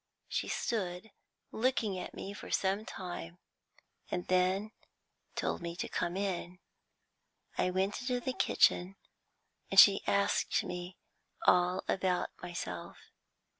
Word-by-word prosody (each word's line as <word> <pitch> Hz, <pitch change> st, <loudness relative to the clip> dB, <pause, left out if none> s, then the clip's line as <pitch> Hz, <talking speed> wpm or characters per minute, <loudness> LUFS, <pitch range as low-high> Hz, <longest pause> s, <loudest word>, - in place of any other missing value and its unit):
She -, -, -2 dB
stood 195 Hz, -2 st, -2 dB, 0.4 s
looking 225 Hz, -4 st, +1 dB
at -, -, -7 dB
me 200 Hz, -, -6 dB
for -, -, -9 dB
some 195 Hz, +3 st, +1 dB
time, 135 Hz, -, -6 dB, 0.7 s
and 180 Hz, -, -2 dB
then 185 Hz, +3 st, +2 dB, 0.6 s
told -, -, -1 dB
me 170 Hz, 0 st, -4 dB
to -, -, -3 dB
come 175 Hz, +2 st, -2 dB
in. 185 Hz, -2 st, -2 dB, 1.0 s
I -, -, +1 dB
went 190 Hz, +4 st, 0 dB
into 250 Hz, 0 st, 0 dB
the 255 Hz, +1 st, -2 dB
kitchen, 185 Hz, -5 st, +3 dB, 0.7 s
and 195 Hz, -, +6 dB
she 200 Hz, -1 st, +9 dB
asked 200 Hz, 0 st, +2 dB
me 180 Hz, +1 st, -6 dB, 0.5 s
all 180 Hz, +1 st, +4 dB
about 185 Hz, -1 st, 0 dB
myself. 170 Hz, -, -5 dB
185 Hz, 120 wpm, -33 LUFS, 180-200 Hz, 1.0 s, she